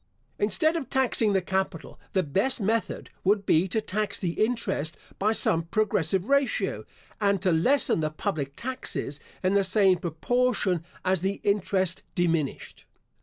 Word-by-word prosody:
Instead 220 - +2
of 285 -7 -3
taxing 245 -5 +2
the 190 -2 +1
capital, 190 -3 -3
the 190 - +2
best 195 - +1
method 220 +2 -1
would 200 +1 +2
be 170 +2 +3
to 220 - 0
tax 210 -1 -1
the 180 -3 -1
interest 215 -9 -1 0.2
by 210 +2 +2
some 170 -6 +3
progressive 190 0 0
ratio, 280 -1 +1 0.4
and 200 -2 +2
to 185 -1 +1
lessen 210 - +3
the 155 -1 0
public 145 -2 -3
taxes 245 - -4 0.2
in 185 +1 +2
the 200 0 +4
same 190 -2 +3
proportion 190 +1 0 0.2
as 185 -2 +1
the 195 +2 -1
interest 190 -3 +1
diminished. 165 -5 -1
195 Hz, 145 wpm, -26 LUFS, 170-220 Hz, 0.4 s, the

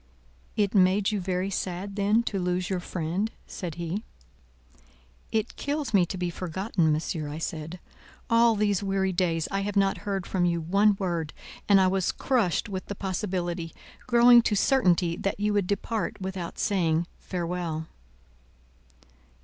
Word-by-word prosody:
"It 205 -2 +1
made 195 +1 +4
you 205 -2 -1
very 185 +1 -1
sad 190 +1 -3
then 210 +3 +2
to 200 -4 -2
lose 180 +1 -1
your 185 - 0
friend?" 175 +4 -2 0.2
said 175 -5 -6
he. 170 +4 -3 1.3
"It 220 0 -1
kills 290 -3 -2
me 185 -4 +4
to 185 - -5
be 175 -1 -2
forgotten, 180 -1 0
Monsieur," 155 0 -2
I 150 - -5
said. 160 +1 -5 0.5
"All 230 0 +4
these 205 -2 +1
weary 195 -1 0
days 170 -3 0
I 195 - 0
have 205 +1 -3
not 195 -1 +2
heard 195 -3 -3
from 185 -2 -1
you 170 -1 +2
one 200 +5 +3
word, 170 -5 -2 0.4
and 200 -1 +7
I 190 - +5
was 185 0 +1
crushed 230 -11 0
with 190 -2 -5
the 200 - -5
possibility, 180 -4 -3 0.3
growing 240 0 +7
to 215 - 0
certainty, 180 -8 +3
that 195 - -2
you 210 0 +1
would 200 -3 +1
depart 210 +3 -2
without 190 -2 -5
saying 170 -4 +1
farewell!" 170 -3 -3
190 Hz, 155 wpm, -27 LUFS, 175-205 Hz, 1.3 s, and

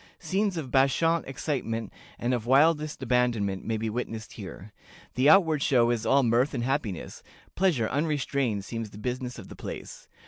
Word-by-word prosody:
Scenes 195 -1 -1
of 140 -6 -5
bacchant 160 +5 +2
excitement 120 -5 -3 0.2
and 120 +2 -1
of 120 -2 -2
wildest 150 +1 +3
abandonment 115 -6 +1
may 115 -1 -1
be 110 +1 -2
witnessed 115 0 -4
here. 100 -1 -9 0.4
The 130 +3 +4
outward 160 -4 +5
show 120 -5 +3
is 115 -1 -1
all 140 0 +4
mirth 125 +5 +2
and 120 - -1
happiness; 125 - -3 0.3
pleasure 165 - +2
unrestrained 140 -7 -1
seems 115 -1 -5
the 100 - -12
business 125 +3 -4
of 100 - -10
the - - -10
place. - - -8
125 Hz, 165 wpm, -27 LUFS, 115-145 Hz, 0.4 s, outward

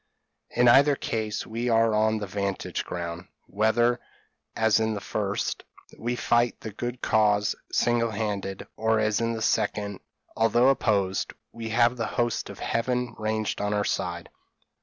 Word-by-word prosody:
In 120 0 +3
either 140 +4 +6
case 110 -4 -3
we 115 +2 -3
are 115 -1 +3
on 110 +1 +2
the 105 - -3
'vantage 100 0 -3
ground, 85 0 -5 0.2
whether, 120 +4 +2 0.6
as 110 -1 +3
in 110 -1 0
the - - -3
first, 100 0 -2 0.3
we 120 +2 -2
fight 120 0 +1
the 110 - -6
good 120 +4 -5
cause 105 -2 +3 0.2
single 120 -1 +2
handed, 100 -3 -3
or 110 0 +1
as 110 +1 +1
in 115 0 0
the 110 -1 -3
second, 105 -2 0 0.4
although 120 +3 +4
opposed, 100 -8 +1 0.2
we 115 -1 -6
have 120 +2 +3
the 115 - -1
host 120 -1 0
of - - -9
Heaven 125 0 -1
ranged 110 -1 -1
on 105 0 0
our 105 0 0
side. 85 -1 -2
110 Hz, 155 wpm, -26 LUFS, 105-120 Hz, 0.6 s, either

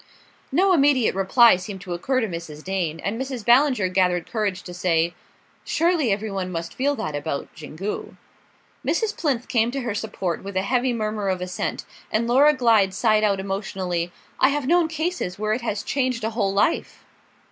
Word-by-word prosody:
No 380 +1 +4
immediate 280 -6 +3
reply 195 +3 +5
seemed 190 +1 -7
to 180 -2 -5
occur 255 +9 0
to 225 - 0
Mrs. 165 -4 -7
Dane, 180 -4 -2
and 225 +5 -3
Mrs. 260 -5 -5
Ballinger 250 -4 +4
gathered 180 -2 +1
courage 205 -4 -1
to 180 - -8
say: 170 -1 +1 0.5
"Surely 330 - +1
every 210 +2 -2
one 190 -2 -3
must 165 -1 -4
feel 285 +2 0
that 190 - -4
about 145 -1 -3
Xingu." 160 +7 -6 0.7
Mrs. 445 -2 0
Plinth 260 -6 -1
came 230 -2 +2
to 270 +2 -3
her 235 -4 -2
support 195 -5 -3
with 195 -1 -5
a 190 - +1
heavy 250 +4 +1
murmur 215 -3 -2
of 185 -1 0
assent, 180 0 -4 0.3
and 220 +2 +1
Laura 270 +5 +5
Glyde 220 -7 +3
sighed 215 0 +3
out 200 -2 +2
emotionally: 190 -3 -3 0.3
"I 265 - +5
have 285 -1 -1
known 340 +3 +3
cases 320 - -3
where 215 +1 0
it 245 - -2
has 210 -3 -3
changed 255 0 -1
a 220 - -1
whole 210 -4 0
life." 200 +11 0
215 Hz, 180 wpm, -23 LUFS, 185-255 Hz, 0.7 s, reply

